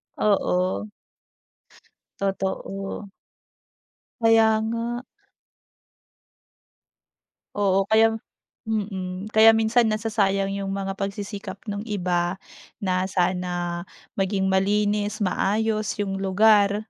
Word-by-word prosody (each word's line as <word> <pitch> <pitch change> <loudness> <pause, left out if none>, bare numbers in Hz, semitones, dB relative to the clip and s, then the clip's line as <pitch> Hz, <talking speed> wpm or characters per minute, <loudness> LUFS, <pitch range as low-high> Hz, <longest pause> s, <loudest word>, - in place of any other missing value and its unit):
Oo. 190 -1 +1 1.3
Totoo. 195 +1 -3 1.1
Kaya 225 -1 +5 0.2
nga. 230 +2 -3 2.5
Oo 195 -1 +2
kaya 225 0 +4 0.5
mm, 195 -2 -3
kaya 220 +1 +7
minsan 225 +1 +3
nasasayang 205 -3 0
yung 195 -1 -3
mga 195 0 -3
pagsisikap 200 0 -5
nung 205 +2 -4
iba, 180 -3 0 0.5
na 185 0 0
sana 175 -2 -1 0.4
maging 190 0 +1
malinis, 205 +2 +1
maayos 215 +3 0
yung 195 -1 -2
lugar. 205 +1 +3
200 Hz, 80 wpm, -24 LUFS, 190-215 Hz, 2.5 s, kaya